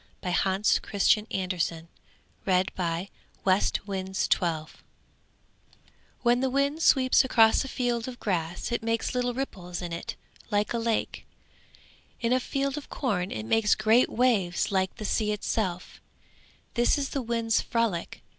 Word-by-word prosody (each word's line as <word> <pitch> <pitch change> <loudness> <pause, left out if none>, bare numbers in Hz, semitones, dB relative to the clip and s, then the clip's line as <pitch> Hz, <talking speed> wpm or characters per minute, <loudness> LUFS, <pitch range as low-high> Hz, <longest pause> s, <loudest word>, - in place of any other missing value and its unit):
THE 180 -1 -1
WIND'S 195 +2 +2
TALE - - -16 0.4
ABOUT 185 -4 -2 0.9
WALDEMAR 185 -1 +3
DAA 185 - -2 0.6
AND 190 0 +1
HIS - - +1
DAUGHTERS 160 -3 0 1.5
When 240 0 +4
the 265 +1 +1
wind 280 +4 0
sweeps 260 -3 +5
across 225 -4 +4
a - - -6
field 245 -2 -1
of 250 -1 -7
grass 175 0 -2
it 235 - -1
makes 230 0 -1
little 245 -1 -1
ripples 180 -10 -5
in 175 -2 -5
it 170 - -5 0.3
like 205 +1 0
a 235 - 0
lake; 230 -1 -2 0.9
in 235 +1 +1
a 255 - +3
field 275 +2 -2
of 290 - -15
corn 195 -9 -1
it 110 0 -5
makes 215 - +3
great 220 +3 +4
waves 215 -10 +1
like 190 -1 0
the 215 - -6
sea 210 +1 +1
itself: 190 -3 -3 0.7
this 240 +3 +3
is 275 -1 -2
the 275 - -2
wind's 230 -2 0
frolic. 230 -8 -2
220 Hz, 145 wpm, -27 LUFS, 185-245 Hz, 1.5 s, sweeps